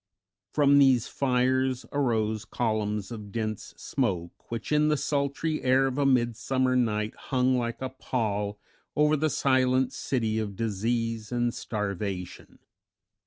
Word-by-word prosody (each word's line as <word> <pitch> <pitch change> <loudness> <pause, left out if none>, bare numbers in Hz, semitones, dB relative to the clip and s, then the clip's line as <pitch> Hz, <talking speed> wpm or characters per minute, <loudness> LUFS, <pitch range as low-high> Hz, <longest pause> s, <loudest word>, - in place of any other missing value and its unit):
From 140 -1 +5
these 130 -4 +5
fires 130 -1 +1
arose 110 -6 0
columns 105 -2 -2
of 105 -3 -7
dense 110 -1 -4
smoke, 85 -2 -3
which 115 +3 -5
in 150 0 +4
the 150 0 +2
sultry 145 +3 -1
air 130 +1 +4
of 135 +1 -1
a 140 - +3
midsummer 125 +1 +1
night 110 -3 +1
hung 130 0 +1
like 120 +1 -2
a 130 - -2
pall 105 -6 -2 0.4
over 150 +1 +4
the 155 +1 +1
silent 130 -2 +2
city 110 -4 -1
of 105 -3 -3
disease 115 +1 -2
and 120 -1 0
starvation. 100 -3 -4
120 Hz, 130 wpm, -27 LUFS, 110-130 Hz, 0.4 s, From